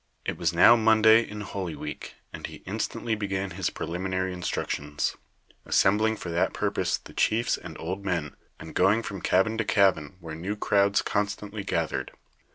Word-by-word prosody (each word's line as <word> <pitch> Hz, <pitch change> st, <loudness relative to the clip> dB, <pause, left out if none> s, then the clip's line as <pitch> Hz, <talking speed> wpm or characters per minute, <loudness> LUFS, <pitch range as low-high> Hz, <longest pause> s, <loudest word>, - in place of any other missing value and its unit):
It -, -, -2 dB
was 85 Hz, -2 st, 0 dB
now 85 Hz, +7 st, +7 dB
Monday 110 Hz, 0 st, +6 dB
in 105 Hz, -2 st, -7 dB
holy 95 Hz, -4 st, -4 dB
week, 75 Hz, -, -7 dB, 0.2 s
and -, -, -6 dB
he -, -, -12 dB
instantly 115 Hz, -, -2 dB
began 100 Hz, -2 st, -2 dB
his 90 Hz, 0 st, -1 dB
preliminary 95 Hz, +2 st, -3 dB
instructions, 75 Hz, -4 st, -2 dB, 0.5 s
assembling 110 Hz, +3 st, +3 dB
for 90 Hz, -5 st, -6 dB
that 85 Hz, +1 st, 0 dB
purpose -, -, 0 dB
the -, -, -14 dB
chiefs 115 Hz, +2 st, +2 dB
and -, -, -9 dB
old 95 Hz, +4 st, -4 dB
men, 85 Hz, -7 st, -2 dB, 0.2 s
and 80 Hz, 0 st, -9 dB
going 100 Hz, +5 st, +3 dB
from 100 Hz, -4 st, -6 dB
cabin 105 Hz, +7 st, +2 dB
to -, -, +2 dB
cabin 95 Hz, -6 st, +2 dB
where 80 Hz, -3 st, -8 dB
new 90 Hz, +6 st, -4 dB
crowds 100 Hz, -1 st, +2 dB
constantly 105 Hz, 0 st, -2 dB
gathered. 80 Hz, -8 st, -2 dB
95 Hz, 165 wpm, -27 LUFS, 85-105 Hz, 0.5 s, now